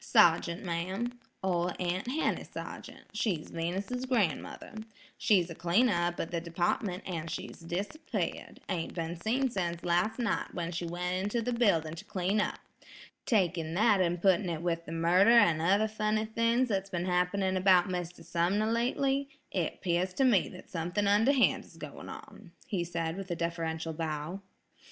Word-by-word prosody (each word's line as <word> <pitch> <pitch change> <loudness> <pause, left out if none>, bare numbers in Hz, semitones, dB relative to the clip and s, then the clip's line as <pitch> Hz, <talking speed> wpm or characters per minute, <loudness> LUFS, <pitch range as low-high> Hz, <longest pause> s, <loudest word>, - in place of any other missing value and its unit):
"Sergeant, 170 +2 +4
ma'am, 190 +8 -3 0.2
Ol' 180 -1 +1
Aunt 180 +4 -1
Henny 290 +6 0
Sargeant, - - -8
she's 200 -7 -1
Venus's 195 +10 -3
gran'mother. 205 - -1 0.4
She's 195 -8 +3
a - - -4
cleaner 175 +10 +3
up 175 0 0
at 165 - -3
the 170 -1 -1
department, 180 +3 -1
an' 165 -3 -3
she's - - -6
disappeared; 195 - -4
ain't 170 -3 -3
been 165 0 -3
seen 240 +9 0
sense 170 -4 -2
last 175 +6 +1
night, 235 -3 -1
when 170 -1 -2
she 175 0 -3
went 180 +1 -2
into 205 +4 -1
the 245 +2 -1
building 170 -10 +2
to 165 - -8
clean 195 +3 0
up. - - -2 0.7
Taking 170 -7 +1
that 205 -1 +4
an' 175 -1 +1
putting 190 +1 +3
it 165 -1 -3
with 170 -1 -1
the - - -6
murder 170 +5 +4
an' 170 -8 +5
other 200 +6 +3
funny 215 0 0
things 230 +3 +1
that's 195 -2 -1
been 175 -2 -2
happening 185 +1 +1
about 185 0 +5
Mr. 180 -2 -4
Sumner 180 +6 +1
lately, 270 +4 +1 0.2
it 175 -4 -2
'pears 180 +1 0
to 270 - +2
me 235 -8 +4
that 185 - -12
something 175 +4 -1
underhand 225 +7 +4
is - - -17
going - - -8
on," - - -11
he 200 -9 -1
said 165 -1 -3
with 195 -1 -6
a 175 - -1
deferential 165 -1 -2
bow. 155 +3 -4
180 Hz, 165 wpm, -31 LUFS, 170-215 Hz, 0.7 s, an